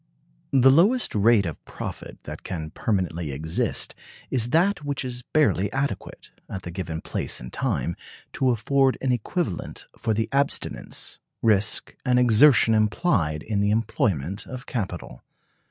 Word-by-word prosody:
The 135 Hz, -1 st, +6 dB
lowest 205 Hz, -, +4 dB
rate 105 Hz, 0 st, +4 dB
of 80 Hz, -4 st, -6 dB
profit -, -, -8 dB
that -, -, -8 dB
can 80 Hz, -4 st, -5 dB
permanently 85 Hz, -7 st, -1 dB
exist 80 Hz, +4 st, -1 dB, 0.4 s
is 120 Hz, -2 st, +1 dB
that 175 Hz, +4 st, +2 dB
which 140 Hz, -2 st, -2 dB
is 125 Hz, -1 st, -5 dB
barely 105 Hz, -10 st, +2 dB
adequate, 135 Hz, +3 st, -4 dB, 0.2 s
at 95 Hz, -2 st, -6 dB
the 85 Hz, -, -6 dB
given 85 Hz, -3 st, -4 dB
place -, -, -3 dB
and -, -, -9 dB
time, 85 Hz, -, -1 dB, 0.4 s
to 130 Hz, -, +1 dB
afford 130 Hz, +3 st, +2 dB
an 130 Hz, -, 0 dB
equivalent 125 Hz, -, -3 dB
for 110 Hz, -2 st, -1 dB
the 110 Hz, +1 st, 0 dB
abstinence, 140 Hz, +1 st, -1 dB, 0.2 s
risk, 110 Hz, -1 st, +2 dB
and 125 Hz, -2 st, +2 dB
exertion 120 Hz, 0 st, +6 dB
implied 105 Hz, -, +1 dB
in 105 Hz, -2 st, -1 dB
the 100 Hz, -, +2 dB
employment 105 Hz, -, -1 dB
of 130 Hz, +1 st, -7 dB
capital. 95 Hz, -, -5 dB
110 Hz, 140 wpm, -25 LUFS, 95-135 Hz, 0.4 s, The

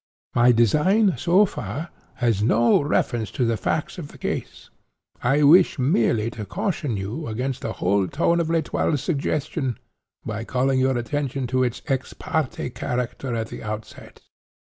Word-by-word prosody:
My 120 Hz, +1 st, +5 dB
design, 175 Hz, -, +3 dB
so 185 Hz, +4 st, +4 dB
far, 170 Hz, -3 st, -5 dB, 0.2 s
has 115 Hz, -5 st, +1 dB
no 115 Hz, +3 st, +4 dB
reference 120 Hz, -6 st, 0 dB
to 125 Hz, -, +2 dB
the 115 Hz, 0 st, +1 dB
facts 155 Hz, -, -2 dB
of 155 Hz, -, -6 dB
the -, -, -15 dB
case. -, -, -5 dB, 0.5 s
I 140 Hz, +5 st, +2 dB
wish 170 Hz, +6 st, +6 dB
merely 115 Hz, -4 st, +1 dB
to 110 Hz, -, -6 dB
caution 140 Hz, -, -2 dB
you 105 Hz, +11 st, -4 dB
against 125 Hz, +4 st, -3 dB
the 115 Hz, -, -3 dB
whole 95 Hz, +1 st, +1 dB
tone 170 Hz, -, +1 dB
of 165 Hz, -1 st, 0 dB
L'Etoile's 160 Hz, -3 st, 0 dB
suggestion, 145 Hz, -, -1 dB, 0.5 s
by 110 Hz, 0 st, -4 dB
calling 130 Hz, +2 st, +1 dB
your 130 Hz, -1 st, +2 dB
attention 135 Hz, +1 st, -2 dB
to 130 Hz, -, +3 dB
its 120 Hz, -2 st, -2 dB
ex 135 Hz, -4 st, -2 dB
parte 155 Hz, -5 st, -2 dB
character 125 Hz, +1 st, -3 dB
at 115 Hz, 0 st, -3 dB
the -, -, -8 dB
outset. 105 Hz, 0 st, -8 dB
130 Hz, 155 wpm, -23 LUFS, 115-150 Hz, 0.5 s, wish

